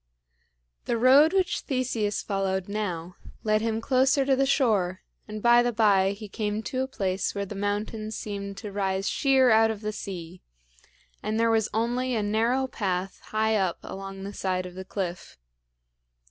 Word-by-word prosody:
The 235 - 0
road 270 +6 +6
which 365 -2 +1
Theseus 235 -6 -1
followed 190 -2 -1
now 180 -5 -4 0.3
led 215 0 +2
him 225 0 -1
closer 265 +3 +2
to 270 0 +3
the 270 +1 +2
shore, 205 -10 +1 0.2
and 215 0 -7
by 240 0 +6
and 240 -1 -1
by 200 -3 +4
he 210 +1 -9
came 210 +1 -3
to 255 +5 -2
a 265 - -1
place 190 -7 -2
where 200 0 -2
the 200 - -7
mountains 210 +2 -3
seemed 200 -1 -5
to 205 0 -7
rise 195 -1 -1
sheer 265 -3 +3
out 220 0 +5
of 215 -2 -4
the 215 0 -3
sea, 180 -4 -7 0.8
and 215 +1 -2
there 230 0 +3
was 220 -2 +2
only 245 +3 0
a, 215 - 0
narrow 230 +5 +1
path 190 -6 -3
high 220 0 +1
up 190 -4 0
along 195 0 -7
the 200 +1 -6
side 185 -2 -2
of 180 - -8
the 190 +1 -8
cliff. 180 - -5
215 Hz, 175 wpm, -26 LUFS, 195-235 Hz, 0.8 s, road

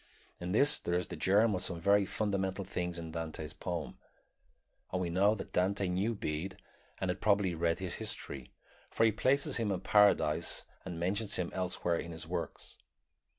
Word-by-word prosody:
In 90 +1 -4
this 140 +9 +5
there 85 - -1
is 90 0 -1
the - - -5
germ 105 +3 +3
of 90 - -1
some 85 -2 0
very 100 +3 +4
fundamental 100 -2 -1
things 90 -1 -3
in 80 -1 -6
Dante's 80 -1 -5
poem, 85 0 -5 0.9
and 90 - -1
we 90 -2 -1
know 100 +5 +4
that 105 - -8
Dante 95 +2 +1
knew 100 +6 0
Bede 85 +1 -3 0.4
and 95 -1 0
had - - -6
probably 100 -3 +3
read 85 0 +1
his 95 -3 -4
history, 70 - -3 0.4
for - - +1
he 110 - +5
places 140 +6 +2
him 110 -3 0
in 95 - -2
Paradise 100 -7 +3 0.2
and 90 -3 -5
mentions 100 +4 0
him 90 -2 -2
elsewhere 90 -2 0
in 85 - -6
his 80 - -4
works. - - -5
95 Hz, 180 wpm, -33 LUFS, 85-100 Hz, 0.9 s, this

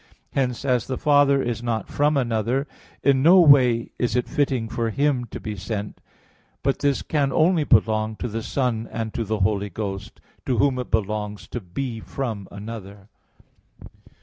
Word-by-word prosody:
Hence, 125 -1 -1
as 125 -5 +1
the 130 - -3
Father 145 -2 +4
is 120 -1 -2
not 115 -2 -2
from 150 +1 +1
another, 120 +2 0 0.4
in 135 -2 +4
no 175 +6 +7
way 130 -8 +5
is 120 - 0
it 125 - 0
fitting 135 -6 0
for 115 0 -2
Him 135 +1 +1
to 115 - -8
be 105 -1 -5
sent; 100 +2 -5 0.6
but 135 - +1
this 140 -1 +1
can 140 -3 0
only 165 0 +3
belong 110 -3 +2
to 120 - -4
the 115 0 -4
Son 115 -2 -1
and 110 -1 -4
to 115 - -2
the 110 -1 -2
Holy 100 +1 +1
Ghost, 95 0 -6 0.3
to 125 - +1
Whom 130 +1 +2
it 125 - -5
belongs 105 -1 -2
to 120 - -4
be 115 +6 -5
from 110 -5 -5
another. 100 -1 -9
120 Hz, 170 wpm, -23 LUFS, 110-135 Hz, 0.6 s, no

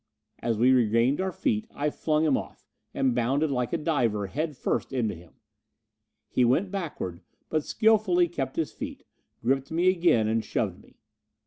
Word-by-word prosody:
As 115 -2 -1
we 125 +4 +5
regained 120 - +3
our 190 0 -1
feet, 220 +2 -1
I 150 +1 -2
flung 155 +1 0
him 145 -4 +3
off, - - -6 0.3
and 130 -2 +1
bounded, 135 +6 +1
like 125 -3 -1
a - - +1
diver, 120 -10 0
head 150 +7 -3
first - - -1
into 120 -5 0
him. 85 0 -14 0.9
He 125 - +1
went 160 +11 +2
backward, 150 - -4 0.3
but 155 -1 0
skilfully 210 -5 +3
kept 135 -6 -4
his 160 - -1
feet, - - -7 0.4
gripped 135 +3 +1
me 170 +3 +3
again 170 - +3
and 110 0 +1
shoved - - -2
me. - - -22
140 Hz, 165 wpm, -27 LUFS, 120-170 Hz, 0.9 s, we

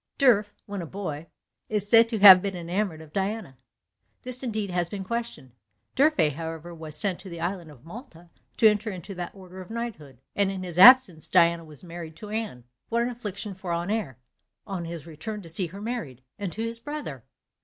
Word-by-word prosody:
D'Urfé, 230 -7 +4 0.2
when 200 -2 -5
a 170 - -6
boy, 165 -4 -6 0.4
is 210 -2 -1
said 230 +2 +6
to 225 - -2
have 195 -3 +10
been 195 -1 -3
enamoured 175 -1 -3
of 155 -1 -15
Diana; 195 - -3 0.6
this 255 -1 -4
indeed 215 -6 -3
has 175 -1 -1
been 195 0 -5
questioned. 230 - -5 0.4
D'Urfé, 260 - +3
however, 165 +2 -7
was 160 -2 -5
sent 185 +3 +4
to 190 0 -11
the 170 -1 -8
island 175 -1 -3
of 145 -2 -16
Malta 175 - -12 0.3
to 225 - +6
enter 210 +1 +1
into 185 0 -7
that 180 0 -6
order 185 -1 -11
of 180 - -12
knighthood; 220 - -6 0.2
and 200 -1 +2
in 190 -1 -5
his 175 -1 -4
absence 195 - +8
Diana 170 -2 +4
was 155 -1 -13
married 170 -2 -8
to 210 +3 -10
Anne. 215 - -4 0.3
What 235 +1 +1
an 240 - -1
affliction 210 -4 -6
for 190 -1 -9
Honoré 175 - -2 0.5
on 185 -4 -5
his 165 -2 -7
return 180 +6 -7
to 165 - -11
see 175 +2 0
her 190 +4 -10
married, 160 - -5 0.2
and 200 -3 -3
to 220 - -4
his 230 0 -4
brother! 260 - -6
185 Hz, 195 wpm, -26 LUFS, 165-215 Hz, 0.6 s, have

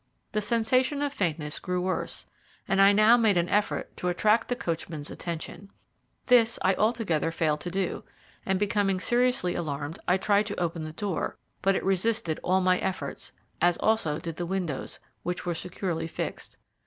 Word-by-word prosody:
The 215 - 0
sensation 255 +6 +2
of 285 -1 -1
faintness 155 - -2
grew 180 -1 -2
worse, 185 +1 -2 0.4
and 195 0 +3
I 195 +1 +8
now 215 +3 +6
made 220 -5 +3
an 170 0 +2
effort 210 0 0
to 180 - -3
attract 210 +5 +2
the 245 - 0
coachman's 165 -6 -4
attention. 170 +3 -6 0.6
This 235 -2 +5
I 190 - +4
altogether 210 -8 +1
failed 155 -2 0
to 175 - -4
do, 185 0 -2 0.4
and 190 -1 0
becoming 200 -2 +1
seriously 240 -4 +2
alarmed 150 -1 -4
I 180 - +4
tried 205 +2 +2
to 205 - -4
open 170 -2 -2
the 155 - -6
door; 190 +1 -3 0.2
but 195 0 +3
it - - -1
resisted 195 -2 +1
all 190 +1 +2
my 185 0 +3
efforts, 190 -1 -3 0.3
as 175 0 +4
also 215 -9 +1
did 165 -1 -6
the 175 - -3
windows, 175 -7 -3 0.2
which 180 +1 -4
were 175 - 0
securely 170 -1 -3
fixed. - - -5
185 Hz, 170 wpm, -27 LUFS, 170-215 Hz, 0.6 s, I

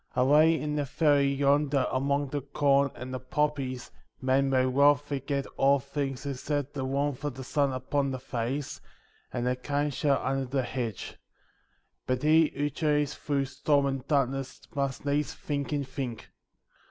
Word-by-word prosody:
Away 150 +6 +5
in 150 0 -2
the 145 - 0
valley 140 -1 +3
yonder 140 0 +2
among 140 +2 0
the 145 +1 -2
corn 140 0 +2
and 130 +1 -7
the 130 - -3
poppies 135 -1 -2 0.3
men 135 +1 +2
may 130 -1 +3
well 140 +3 +5
forget 140 -1 -3
all 140 +1 +5
things 140 0 -4
except 140 +1 -2
the 135 -2 -3
warmth 140 0 -1
of 145 -4 -3
the 130 - -7
sun 140 +1 +1
upon 135 +2 -1
the 130 - -3
face, 130 +2 -4 0.5
and 120 -1 -2
the 125 0 +1
kind 145 +3 -1
shadow 140 +1 +2
under 135 0 0
the 130 +1 -1
hedge; 120 -4 -4 0.9
but 130 +1 -1
he 160 +1 +5
who 145 +1 -1
journeys 150 0 +1
through 140 -2 -1
storm 140 +1 +1
and 135 -2 -3
darkness 135 -2 0
must 140 -1 -2
needs 145 +1 0
think 140 -1 -3
and 145 -3 -1
think. 130 -6 -6
140 Hz, 165 wpm, -28 LUFS, 130-145 Hz, 0.9 s, Away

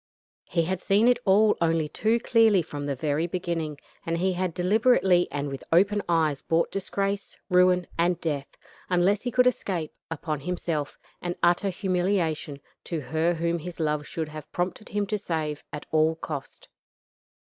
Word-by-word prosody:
He 170 - +1
had 185 +2 -2
seen 205 +4 +3
it 245 -1 +4
all 210 +2 +5
only 165 -2 +2
too 220 +9 +1
clearly 225 -6 +4
from 145 -3 -6
the 140 - -1
very 150 +4 0
beginning, 170 -4 -3 0.3
and 165 0 -1
he 185 +2 +1
had 180 0 -1
deliberately 185 0 +3
and 145 0 -2
with 135 -1 -6
open 200 +5 +4
eyes 155 -4 +2
brought 165 +1 +1
disgrace, 195 +1 -2
ruin, 180 0 +4
and 175 +1 +2
death 145 -4 -3 0.3
unless 185 +3 +3
he 245 - -2
could 250 +1 +3
escape 185 -10 -1 0.2
upon 155 -2 -3
himself, 165 -2 -3 0.2
and 175 0 -3
utter 175 +3 +3
humiliation 175 -6 -1 0.2
to 165 - -3
her 160 +5 0
whom 170 +1 -1
his 175 +2 -8
love 150 -2 -1
should 160 -2 -4
have 155 -1 -9
prompted 180 +4 -3
him 205 -1 -1
to 210 +1 -2
save 155 -5 -3
at 150 - -6
all 160 +1 +3
cost. 150 -4 -7
175 Hz, 165 wpm, -26 LUFS, 155-195 Hz, 0.3 s, all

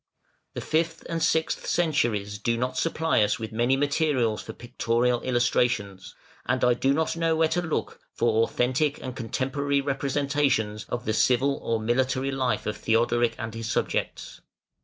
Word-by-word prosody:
The - - -3
fifth 165 +1 -1
and 165 -1 -3
sixth 160 0 0
centuries 110 -12 0
do 115 +2 0
not 125 +2 -2
supply 160 -3 +1
us 105 0 +2
with 110 -1 -6
many 120 +4 +1
materials 145 -6 +1
for - - -8
pictorial 120 +1 0
illustrations, 120 -6 0 0.3
and 125 +1 0
I 125 - +5
do 135 +3 +1
not 160 +3 0
know 165 -1 +1
where 160 0 +3
to 175 +2 0
look 160 -3 -3
for 115 -1 +1
authentic 130 +5 +1
and 130 -1 -6
contemporary 140 +4 -1
representations 135 -6 0
of 120 -2 -4
the 110 - 0
civil 130 +5 +2
or 115 -1 -1
military 130 +4 0
life 125 -6 -1
of 105 - -3
Theodoric 115 +1 +1
and 110 0 -5
his 115 0 -5
subjects. - - -2
125 Hz, 160 wpm, -26 LUFS, 115-140 Hz, 0.3 s, I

